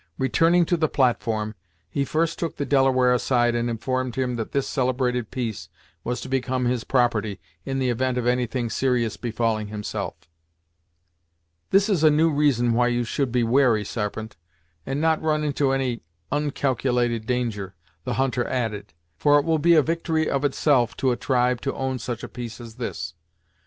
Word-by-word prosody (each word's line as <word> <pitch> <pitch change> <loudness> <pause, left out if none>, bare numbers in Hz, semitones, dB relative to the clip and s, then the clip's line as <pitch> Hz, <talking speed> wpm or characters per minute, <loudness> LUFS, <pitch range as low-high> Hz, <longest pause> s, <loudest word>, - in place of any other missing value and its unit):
Returning 165 +6 +3
to 175 - +1
the 160 -2 +1
platform, 115 -4 0 0.3
he 140 +11 -1
first 165 +3 0
took 165 - -3
the 145 - -2
Delaware 130 -3 +3
aside, 120 -1 +2
and 120 0 0
informed 130 +2 -2
him 125 -2 -1
that 115 -2 -4
this 140 -1 0
celebrated 125 -2 0
piece 120 -6 -4 0.3
was 125 +1 -2
to - - -6
become 130 -1 -1
his 120 -1 0
property, 110 -6 +1 0.3
in 135 - -2
the 130 -2 +1
event 130 +1 0
of 125 - -1
any 125 0 +2
thing 120 -1 -3
serious 125 -4 0
befalling 115 -2 -1
himself. 105 -1 -4 1.5
"This 195 +2 +4
is 190 -7 +1
a 155 - +8
new 155 +2 +3
reason 135 -5 +2
why 120 +1 +3
you 120 0 +1
should 130 +2 -1
be 125 0 +2
wary, 115 -3 +3
Sarpent, 110 +1 -4 0.5
and 135 +1 -1
not 160 0 +2
run 155 -1 +1
into 140 -2 +1
any 130 -3 -1 0.3
oncalculated 125 -5 0
danger," 115 -7 -2 0.3
the - - -2
hunter 130 -2 0
added, 110 -7 -3 0.2
"for, 145 - +4
it 145 - +1
will 160 -1 +2
be 170 +3 +5
a 155 - +6
victory 160 0 0
of 140 +1 0
itself 135 -4 +2
to 130 - +2
a - - +1
tribe 125 -1 +1
to 135 - -2
own 130 -1 -2
such 120 0 -5
a - - -4
piece 120 -1 -7
as 115 -2 -11
this! 85 -9 -4
125 Hz, 175 wpm, -24 LUFS, 120-140 Hz, 1.5 s, a